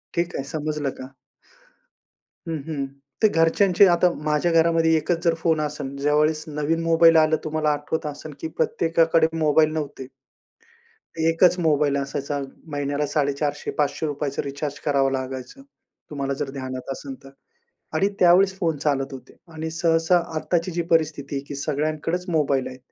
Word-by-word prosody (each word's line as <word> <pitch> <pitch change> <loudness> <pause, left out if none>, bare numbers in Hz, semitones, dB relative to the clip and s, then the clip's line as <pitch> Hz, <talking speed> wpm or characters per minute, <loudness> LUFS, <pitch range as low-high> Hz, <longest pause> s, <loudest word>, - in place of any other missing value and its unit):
ठीक 175 0 -1
आहे 135 - -2
समजलं 150 -1 -2
का? 130 - -6 1.4
हं, 165 - -2
हं. 140 -3 -2 0.4
ते - - +8
घरच्यांचे 175 +4 +4
आता 175 0 +4
माझ्या 155 +3 +1
घरामध्ये 165 0 +3
एकचं 165 +2 -1
जर 170 - +3
फोन 160 -2 +2
असेन, 145 -2 -4
ज्यावेळेस 150 +2 +1
नवीन 150 +2 -1
मोबाईल 165 0 +5
आला, 155 0 +4
तुम्हाला 155 0 0
आठवत 150 +2 -3
असेन 150 +1 -7
की 160 - -2
प्रत्येकाकडे 165 -1 +2
मोबाईल 155 0 +3
नव्हते 145 -3 -4 1.3
1चं 180 +2 +3
मोबाईल 145 -2 +2
असायचा. 140 +1 -3 0.3
महिन्याला 145 0 -1
₹450-500चं 145 0 -1
रिचार्ज 140 +1 -5
करावं 135 -2 +2
लागायचं. 130 - -5 0.5
तुम्हाला 140 -2 -3
जर 135 - -2
ध्यानात 130 -1 -6
असेल 135 0 -6
तर, 135 - -12 0.7
आणि 195 - +2
त्यावेळेस 185 +2 +5
फोन 165 -4 0
चालत 140 -1 -1
होते. 130 - -11 0.2
आणि 160 +1 -4
सहसा 165 +1 +2 0.2
आत्ताची 170 +2 -1
जी 170 - -1
परिस्थिती 150 -4 0
की 145 - -5
सगळ्यांकडेचं 155 +5 -2
मोबाईल 140 -4 +1
आहेत. 130 - -10
150 Hz, 140 wpm, -23 LUFS, 140-165 Hz, 1.4 s, ते